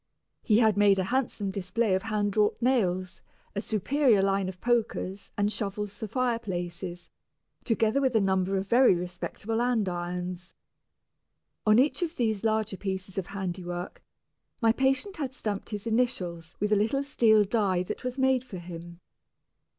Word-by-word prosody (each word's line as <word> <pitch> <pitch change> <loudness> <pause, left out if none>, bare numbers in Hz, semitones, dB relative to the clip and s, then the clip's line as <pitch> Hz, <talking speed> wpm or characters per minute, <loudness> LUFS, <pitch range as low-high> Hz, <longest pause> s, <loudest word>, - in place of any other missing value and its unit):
He 215 -3 +3
had 220 -3 +4
made 205 -1 +5
a 190 - +1
handsome 220 -2 -1
display 200 +3 0
of 190 - +2
hand 205 -1 -1
wrought 210 -1 +3
nails, 185 -8 0 0.3
a 200 - -1
superior 230 0 +2
line 195 -1 +1
of 185 -1 -9
pokers 225 -4 -1
and 205 0 +1
shovels 205 -1 -3
for 220 - -5
fireplaces, 190 -7 -3 0.6
together 225 +2 +2
with 260 -3 +1
a - - +6
number 190 -1 +1
of 190 - -2
very 245 -2 +5
respectable 180 +5 -3
andirons. 180 -6 -2 1.1
On 215 +1 +6
each 275 +7 +3
of 340 -1 -2
these 220 -4 0
larger 220 -2 0
pieces 190 0 -4
of 185 - -5
handiwork 180 -2 -5 0.6
my 225 -2 +4
patient 270 - 0
had 275 -4 -3
stamped 210 -6 -4
his 210 -2 -4
initials 185 -9 -1
with 210 +1 0
a - - +6
little 225 +7 +1
steel 220 -6 +4
die 195 -4 +1
that 185 - -6
was 250 +1 -3
made 265 -1 +3
for 245 -7 -8
him. 170 0 -9
205 Hz, 155 wpm, -28 LUFS, 185-235 Hz, 1.1 s, a